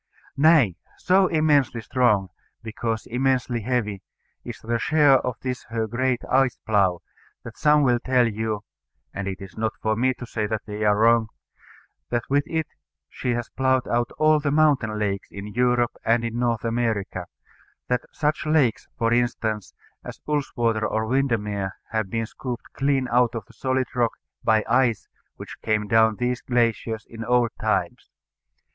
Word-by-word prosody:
Nay, 140 - +4 0.2
so 185 +1 +3
immensely 150 -7 +2
strong, 110 -5 +1 0.3
because 115 0 -3
immensely 125 -1 0
heavy, 105 -4 -1 0.4
is - - -8
the 115 +1 -2
share 145 -1 +4
of 125 -1 -3
this 125 -1 -4
her 115 -1 -2
great 125 +2 -1
ice 130 -1 +2
plough, 95 -5 +2 0.4
that - - -9
some 150 0 +4
will 120 -3 +3
tell 125 -1 +2
you 110 -1 -3 0.5
(and 100 -1 -4
it 95 -1 -4
is 95 -2 -10
not 110 0 0
for 110 0 0
me 130 +3 +1
to 125 - -8
say 110 -2 -2
that 110 0 -3
they 105 0 -5
are 105 -1 +3
wrong) 115 0 +4 0.8
that 120 -1 0
with 145 +1 +3
it 160 -2 -1 0.4
she 125 - -2
has 120 0 -4
ploughed 130 -1 +1
out 120 0 +1
all 155 0 +4
the 145 -1 -1
mountain 140 -7 +2
lakes 100 -2 -2
in 100 0 -8
Europe 125 -1 +2
and 115 +1 +2
in 115 +1 -3
North 120 -2 0
America; 110 -6 -1 0.6
that 125 -1 +1
such 150 0 -1
lakes, 145 -7 +2
for 115 0 +1
instance, 115 -4 -1 0.3
as - - -9
Ullswater 120 -7 0
or 110 +1 -1
Windermere 105 -6 -1 0.2
have 110 -3 -1
been 115 +2 -1
scooped 120 +1 -7
clean 135 -1 +1
out 120 -1 +3
of 110 -4 -5
the - - -19
solid 130 0 0
rock 120 -2 +1 0.3
by 110 -1 +3
ice 120 -2 +2 0.3
which - - -10
came 110 -1 0
down 110 0 +4
these 125 +2 -1
glaciers 115 -2 0
in 115 -1 -8
old 120 0 +2
times. - - -1
120 Hz, 165 wpm, -24 LUFS, 110-130 Hz, 0.8 s, Nay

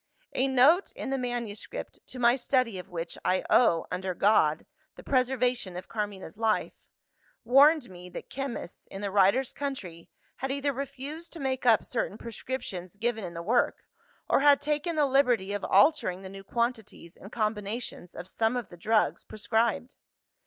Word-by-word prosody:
"A 260 - +2
note 270 +8 +4
in - - -5
the 270 - 0
manuscript 240 -4 -5
to - - -9
my 240 0 +4
study 250 -5 0
of 180 - -10
which, 170 -2 -5
I 185 0 +1
owe, 175 -9 +4
under 185 0 -3
God, 170 -6 +3 0.3
the - - -12
preservation 250 -7 0
of 180 - -8
Carmina's 205 -3 -5
life 220 -1 +1 0.7
warned 280 +3 +5
me 180 -2 -11
that - - -8
chemists, 270 -9 -6
in 195 - -8
the 200 -1 -3
writer's 205 +7 +3
country, 195 -13 -6 0.3
had 265 +1 -3
either 280 +1 -1
refused 280 +5 -6
to 335 - -8
make 260 -2 -2
up 225 -3 +5
certain 205 - -2
prescriptions 225 -6 -6
given 220 +1 -1
in 175 -2 -6
the 170 - -5
work, 240 +6 +1 0.4
or - - +3
had 285 0 +6
taken 300 +3 -1
the 300 -2 +3
liberty 250 -8 +2
of 205 - -3
altering 195 - +3
the 190 - -7
new 195 0 -10
quantities 220 -6 -3
and 200 - -13
combinations 215 -3 -3
of 180 - -7
some 225 +5 0
of 240 - -5
the 175 - -12
drugs 215 +5 +1
prescribed. 225 +3 -1
230 Hz, 165 wpm, -28 LUFS, 195-265 Hz, 0.7 s, had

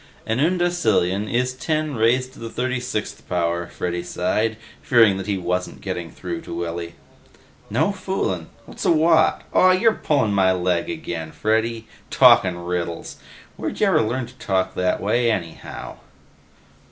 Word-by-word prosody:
"An 110 +3 -1
undecillion 140 - +1
is 125 +1 +1
ten 155 +3 -2
raised 125 +3 +1
to - - -15
the 115 - -6
36th 125 -3 -3
power," 85 -1 0
Freddy 90 0 -3
sighed, 105 +5 -1 0.2
fearing 110 -6 +4
that 95 0 -5
he 100 -2 0
wasn't 90 0 -2
getting 90 -3 -4
through 85 +1 -6
to - - -7
Willy. 85 0 -4 0.7
"No 150 - +1
foolin'? 185 - -2 0.2
What's - - -8
a - - +3
watt... 160 0 +4
aw, 185 - +6
you're 225 +4 +4
pullin' 140 - +1
my 95 -1 +4
leg 90 -1 0
again, 85 - -5
Freddy, 110 +3 0 0.2
talkin' 85 -2 +5
riddles. 85 -1 -4 0.4
Where'd - - -4
ya - - +4
ever - - +4
learn 120 +3 -1
to 120 - -14
talk 95 -1 0
that 90 0 0
way 120 +3 +2
anyhow!" 85 -7 -5
105 Hz, 150 wpm, -22 LUFS, 90-130 Hz, 0.7 s, aw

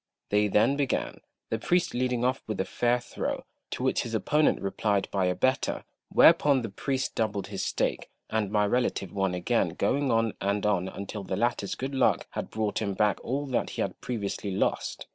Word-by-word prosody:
They 105 0 +3
then 115 +7 +3
began, 140 -3 -1 0.3
the - - 0
priest 180 0 +1
leading 125 -1 0
off 130 +1 +1
with 110 -2 -3
a 95 - +1
fair 120 0 +1
throw, 120 - -4 0.2
to - - -4
which - - +2
his 115 -1 -4
opponent 150 +7 +2
replied 100 0 0
by 95 -2 +1
a 90 - +1
better; 130 +8 0 0.3
whereupon 140 -4 +6
the 115 - -3
priest 135 +6 -2
doubled 105 -3 -1
his - - -3
stake, - - -1 0.2
and 110 -3 -1
my 105 0 +2
relative 105 -4 0
won 95 -2 0
again, 90 -2 0
going 135 +9 +1
on 115 -2 +2
and 100 +1 0
on 95 -3 +1
until 100 +1 -6
the 95 0 -3
latter's 115 -3 0
good 135 +2 -4
luck 135 - +2
had - - -4
brought 110 -1 -1
him 100 -3 -1
back 105 -1 +1
all 140 +4 -2
that 125 - 0
he - - +1
had - - -5
previously 105 -4 -3
lost. 95 - -1
110 Hz, 195 wpm, -28 LUFS, 100-125 Hz, 0.3 s, whereupon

